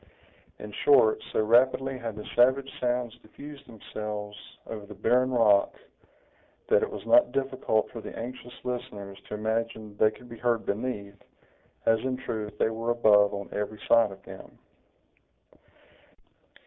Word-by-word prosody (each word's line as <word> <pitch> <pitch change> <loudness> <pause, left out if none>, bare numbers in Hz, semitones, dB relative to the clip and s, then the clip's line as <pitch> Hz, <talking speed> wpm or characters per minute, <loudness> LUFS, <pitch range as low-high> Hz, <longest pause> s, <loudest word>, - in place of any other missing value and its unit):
In 105 - -9
short, 115 -7 +5
so - - +1
rapidly 130 +3 +3
had 115 -3 -5
the 105 - -8
savage 130 +3 +4
sounds 125 -2 -1
diffused 140 +6 -12
themselves 105 -2 -6 0.3
over 105 -2 -7
the 105 - -10
barren 125 +6 +2
rock, 110 -5 +4 0.9
that 475 +2 +5
it 445 - -1
was 435 - -8
not 300 +1 +5
difficult 130 -5 0
for 115 - -7
the - - -8
anxious 125 +1 -7
listeners 120 -6 -5
to - - -5
imagine 110 -1 -3
they 110 - +5
could 125 +3 -14
be 115 -1 -10
heard 120 -2 0
beneath, 100 -2 -4 0.6
as 115 0 +4
in 130 +2 -2
truth 110 -5 -5
they 110 - +2
were 115 +1 -3
above 105 -4 +5
on 100 0 -5
every 105 +1 -4
side 115 -3 +5
of 95 0 -12
them. - - -12
115 Hz, 150 wpm, -28 LUFS, 105-125 Hz, 0.9 s, short